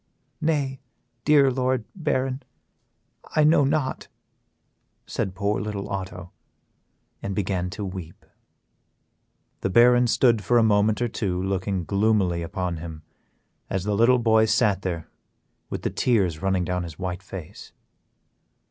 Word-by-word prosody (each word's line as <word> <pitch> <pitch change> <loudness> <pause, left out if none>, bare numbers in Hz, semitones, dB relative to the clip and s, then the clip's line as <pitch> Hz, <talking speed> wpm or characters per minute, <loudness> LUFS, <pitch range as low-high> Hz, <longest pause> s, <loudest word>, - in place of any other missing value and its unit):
"Nay, 145 -4 0 0.5
dear 140 -3 +5
Lord 130 -2 0
Baron, 135 -6 -1 0.9
I 155 - +5
know 150 -1 +5
not," 140 -1 -1 1.0
said 95 - -3
poor 100 0 0
little 105 -2 -4
Otto, 95 -2 -5 0.9
and 100 -1 -4
began 95 -3 -1
to 100 +3 -5
weep. 90 -3 -8 1.3
The - - -1
Baron 120 +3 +5
stood 115 -2 +3
for 120 - +3
a 115 - +5
moment 105 +1 +3
or - - +1
two 95 -5 -2
looking 95 -1 -2
gloomily 100 -4 +1
upon 90 0 -3
him, 80 -1 -8 0.7
as 95 -1 -1
the 105 +1 -1
little 120 +4 +5
boy 110 -2 +4
sat 105 -2 +2
there 85 -4 -4 0.6
with - - -5
the - - -1
tears 95 -10 +1
running 95 -2 +1
down 90 0 -1
his 80 -3 -7
white 90 -1 -4
face. 95 -1 -10
100 Hz, 130 wpm, -24 LUFS, 95-120 Hz, 1.3 s, dear